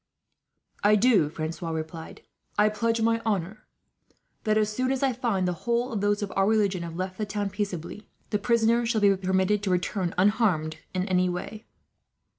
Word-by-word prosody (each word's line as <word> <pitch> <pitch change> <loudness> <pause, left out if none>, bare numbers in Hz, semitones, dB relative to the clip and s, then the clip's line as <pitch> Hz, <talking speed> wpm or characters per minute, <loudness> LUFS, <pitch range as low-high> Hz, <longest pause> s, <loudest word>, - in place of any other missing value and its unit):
"I 210 +1 +6
do," 210 -8 +4
Francois 165 +2 -5
replied. 160 0 -6 0.3
"I 210 +1 +5
pledge 230 +2 0
my 230 0 +2
honour 205 -1 -2 0.8
that, 215 0 +2
as 215 0 +1
soon 255 +2 0
as 270 0 -1
I 265 -2 +2
find 225 -7 0
that - - +1
the 175 - -6
whole 240 +2 0
of 205 - -2
those 205 +1 +1
of 200 - -5
our 195 0 +3
religion 205 -4 +2
have 170 -1 -6
left 185 +2 -4
the 215 - 0
town 205 -1 -2
peaceably, 200 0 -5 0.2
the 210 - +1
prisoners 235 +1 +2
shall 225 -3 +1
be 200 -1 +5
permitted 190 +2 +1
to 205 - -2
return, 180 0 -1
unharmed 185 -6 +2 0.2
in 185 +1 -1
any 185 -1 +2
way." 200 +5 -6
205 Hz, 185 wpm, -26 LUFS, 185-220 Hz, 0.8 s, I